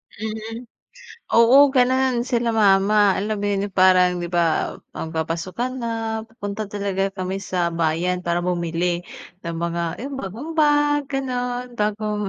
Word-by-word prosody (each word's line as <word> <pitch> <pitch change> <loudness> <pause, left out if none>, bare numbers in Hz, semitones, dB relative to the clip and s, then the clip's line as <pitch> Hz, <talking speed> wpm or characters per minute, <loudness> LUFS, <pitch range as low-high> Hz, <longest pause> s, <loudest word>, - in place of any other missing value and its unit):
Mm. 220 +2 -6 0.7
Oo 265 +5 +6
ganun 255 -1 +2
sila 240 -2 0
mama, 205 -1 +4
alam 210 +1 -2
mo 205 - -4
yun, 200 0 -1
parang, 185 -1 +4
'di 175 - -3
ba, 170 -2 0 0.2
magpapasukan 170 +10 -3
na 235 -2 -3 0.4
pupunta 215 -1 -5
talaga 200 -1 -2
kami 190 0 -3
sa 180 -3 -1
bayan 170 +2 0
para 175 -1 -1
bumili 175 0 -1 0.5
ng 170 - -3
mga 170 0 -2 0.2
yung 280 0 -5
bagong 230 - -6
bag, 290 -1 +3
ganun, 250 -2 -3
bagong 210 0 -1
205 Hz, 130 wpm, -22 LUFS, 180-245 Hz, 0.7 s, Oo